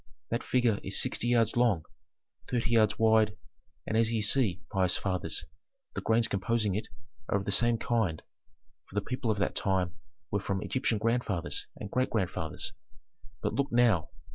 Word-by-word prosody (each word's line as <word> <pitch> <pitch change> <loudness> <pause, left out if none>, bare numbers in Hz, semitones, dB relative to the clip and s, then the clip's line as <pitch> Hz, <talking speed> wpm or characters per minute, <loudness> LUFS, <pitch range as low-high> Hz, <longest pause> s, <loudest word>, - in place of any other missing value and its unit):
"That 115 - 0
figure 120 -4 +2
is - - 0
sixty 120 - 0
yards 115 -2 +3
long, 115 -10 +2 0.6
thirty 120 -2 0
yards 110 -2 +4
wide, 110 -1 +4 0.5
and 110 - -2
as 115 0 +3
ye 115 - +1
see, 105 -4 +1
pious 95 -3 +2
fathers, 95 -2 -1 0.5
the - - -3
grains 115 0 +3
composing 105 +1 0
it 105 +3 -2 0.4
are - - +3
of 100 - -4
the - - -1
same 120 +3 +3
kind, 110 -10 0 0.7
for - - -14
the 105 - 0
people 125 -2 -2
of 105 - +1
that 100 - 0
time 95 -3 0 0.4
were 100 - +1
from 95 0 -2
Egyptian 125 -4 0
grandfathers 110 -5 -1
and 100 - -8
great 130 0 +1
grandfathers. 95 -7 -2 0.7
But - - 0
look 140 +1 0
now." 115 -9 +3
110 Hz, 165 wpm, -30 LUFS, 100-120 Hz, 0.7 s, yards